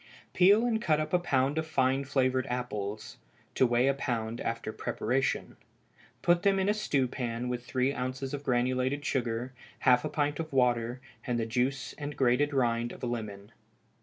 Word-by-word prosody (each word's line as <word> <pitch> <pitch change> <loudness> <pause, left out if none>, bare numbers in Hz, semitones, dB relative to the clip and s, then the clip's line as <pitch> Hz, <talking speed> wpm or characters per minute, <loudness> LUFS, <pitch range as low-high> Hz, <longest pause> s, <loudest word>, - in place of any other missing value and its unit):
_ - - -39
Peel 200 +6 +5
and 230 -2 0
cut 155 -8 +2
up 155 - -3
a 180 - +5
pound 140 -3 +1
of 160 - -3
fine 135 -2 +1
flavored 130 -1 +1
apples 110 -3 -4 0.4
(to 130 - +3
weigh 120 +1 +2
a 140 - +4
pound 120 -4 -3
after 115 -1 -3
preparation); 125 +4 -1 0.7
put 175 0 +4
them 200 -1 +3
in 190 0 +1
a 205 - +4
stewpan 125 - -1
with 125 -1 -3
three 130 +2 0
ounces 130 +1 -4
of 145 - -3
granulated 130 +2 0
sugar, 120 -1 -2 0.3
half 125 -2 +5
a - - -2
pint 145 0 -1
of 160 -1 -4
water, 120 -2 +1 0.3
and 120 -1 0
the 115 - 0
juice 125 +4 -1
and 145 0 -5
grated 135 +3 +3
rind 120 -3 +1
of - - -11
a - - +1
lemon. 105 -4 -5
130 Hz, 180 wpm, -30 LUFS, 120-145 Hz, 0.7 s, Peel